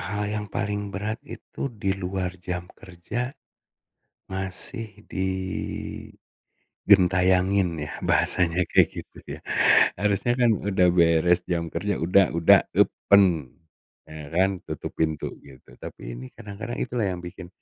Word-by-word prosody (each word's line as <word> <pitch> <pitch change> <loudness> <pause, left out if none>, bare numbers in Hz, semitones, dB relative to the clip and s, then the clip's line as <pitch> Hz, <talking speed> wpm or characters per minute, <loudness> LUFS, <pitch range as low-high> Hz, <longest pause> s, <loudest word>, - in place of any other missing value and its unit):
Hal 105 +1 -3
yang 105 -1 -3
paling 105 +1 -3
berat 105 +4 -4
itu - - -7
di 100 -5 -2
luar 95 -1 -3
jam 90 -1 -4
kerja. 100 +7 -5 1.0
Masih 95 +3 -4 0.2
digentayangin 95 0 -5 1.4
ya, 75 - -5
bahasanya 90 0 +2
kayak - - +5
gitu - - -10 0.2
ya. - - -21 0.6
Harusnya 105 +4 +1
kan 120 -2 +5
udah 95 -3 +2
beres 85 0 +3
jam 85 -2 -1
kerja 100 -1 -1
udah, 90 +3 +4
udah, 85 - +6 0.2
yupen. 90 -9 +3 0.5
Ya 75 -2 -9
kan? 95 0 +2
Tutup - - -5
pintu 80 -1 -1
gitu, 65 -3 -16
tapi - - -8
ini 65 +2 -8
kadang-kadang 110 +4 -7
itulah 120 -4 -1
yang 90 - -5
bikin, 85 0 -9
95 Hz, 125 wpm, -25 LUFS, 85-100 Hz, 1.4 s, udah